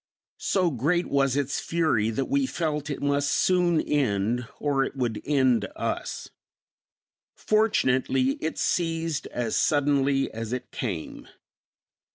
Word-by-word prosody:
So 180 -3 +1
great 160 +8 +1
was 135 -2 +1
its 140 -1 -1
fury 155 -11 +1
that 115 +4 -1
we 275 0 +1
felt 150 - -2
it 140 - -4
must 140 0 +1
soon 175 +2 +3
end 120 -3 0
or 140 -2 +1
it 135 - -5
would 120 -5 -2
end 130 -6 +2
us. - - -3 1.1
Fortunately, 135 - +2
it 160 - -3
ceased 165 -3 -1
as 115 -3 -2
suddenly 140 -2 +2
as 115 +1 -5
it 125 - -5
came. 95 -10 -5
140 Hz, 125 wpm, -26 LUFS, 125-160 Hz, 1.1 s, soon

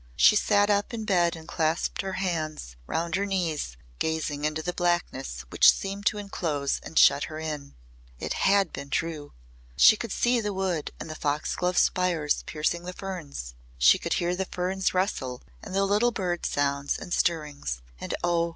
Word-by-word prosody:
She 145 - +6
sat 205 0 +3
up 205 +3 0
in 220 -1 -5
bed 175 -4 +2
and 160 -1 -11
clasped 160 -1 0
her 190 -1 -4
hands 155 - -3
round 165 0 -2
her 195 +3 +1
knees 160 - -2 0.2
gazing 155 -2 -1
into 155 +1 -1
the 180 - -2
blackness 175 - -1
which - - +7
seemed 200 +1 -4
to 210 - +2
enclose 160 -9 -2
and 160 - -8
shut 140 +1 +6
her 155 - -7
in. 150 -3 -5 0.4
It - - -3
had 195 -3 +2
been 140 - -6
true! 155 -2 -3 0.4
She 215 - +8
could 225 0 -5
see 240 +3 +2
the 210 -1 -2
wood 185 -5 -1
and - - -6
the 155 - -5
foxglove 155 +4 -1
spires 170 -5 +2
piercing 160 +2 -1
the 180 +1 -6
ferns. 160 - -6 0.2
She - - +6
could - - -2
hear 175 +1 0
the 190 +1 -2
ferns 185 +1 -1
rustle 135 -10 -1 0.2
and - - -7
the 195 0 +3
little 210 +5 +3
bird 180 -6 -2
sounds 140 0 0
and 175 - -6
stirrings. 145 - -1 0.2
And - - -3
oh! 170 -1 +2
170 Hz, 180 wpm, -27 LUFS, 150-190 Hz, 0.4 s, She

